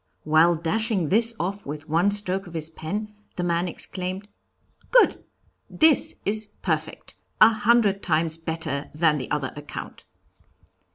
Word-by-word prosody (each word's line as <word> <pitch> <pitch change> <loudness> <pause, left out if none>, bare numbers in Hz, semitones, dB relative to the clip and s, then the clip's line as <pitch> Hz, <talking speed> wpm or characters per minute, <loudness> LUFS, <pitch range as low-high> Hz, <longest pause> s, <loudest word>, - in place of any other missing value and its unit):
"While 160 +3 +4
dashing 185 - -1
this 230 +3 +3
off 195 +4 -3
with 150 +2 -7
one 165 +5 +2
stroke 195 -2 0
of 170 - -11
his 160 0 -1
pen, 210 +7 -5 0.2
the 180 - -3
man 175 0 0
exclaimed: 185 +3 -4 0.6
'Good! - - +4 0.5
this 315 -3 +3
is 215 +1 0
perfect! - - -4 0.3
a 215 - +9
hundred 220 -2 +2
times 160 -1 0
better 160 -3 -4
than 155 -2 +2
the 130 - -6
other 140 -3 -2
account.' 145 0 -9
175 Hz, 135 wpm, -24 LUFS, 160-210 Hz, 0.6 s, a